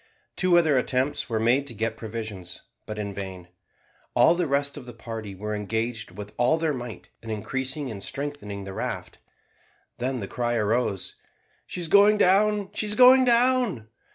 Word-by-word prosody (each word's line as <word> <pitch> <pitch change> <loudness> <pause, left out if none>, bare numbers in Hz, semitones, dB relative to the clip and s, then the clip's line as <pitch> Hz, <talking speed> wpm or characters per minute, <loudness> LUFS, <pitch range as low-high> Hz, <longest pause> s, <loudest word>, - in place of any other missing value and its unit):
Two 180 -2 +4
other 155 -6 +4
attempts 130 +2 -1
were 110 -1 0
made 125 +5 +2
to 120 - -7
get 115 +2 -2
provisions, 110 -5 -7 0.3
but 110 - -5
in 100 -1 -4
vain. 95 -3 -7 0.7
All 165 - +6
the 175 -1 0
rest 140 0 0
of 125 - -9
the 120 - -9
party 110 -3 -7
were 105 +3 -4
engaged 110 +2 -2
with 105 +3 -9
all 125 +7 +4
their 160 -2 0
might 120 -4 -7
in 115 - -9
increasing 130 +5 -3
and 100 -3 -7
strengthening 135 -7 -5
the 95 0 -7
raft. - - -5 0.8
Then 130 +1 -1
the 100 - -5
cry 120 +1 -1
arose, 110 -3 -1 0.5
"She 180 - -5
is 170 - -2
going 205 +5 +6
down, 205 +1 +3
she 215 - -2
is 210 - +1
going 255 +1 +8
down!" 240 - +2
120 Hz, 175 wpm, -26 LUFS, 105-160 Hz, 0.8 s, going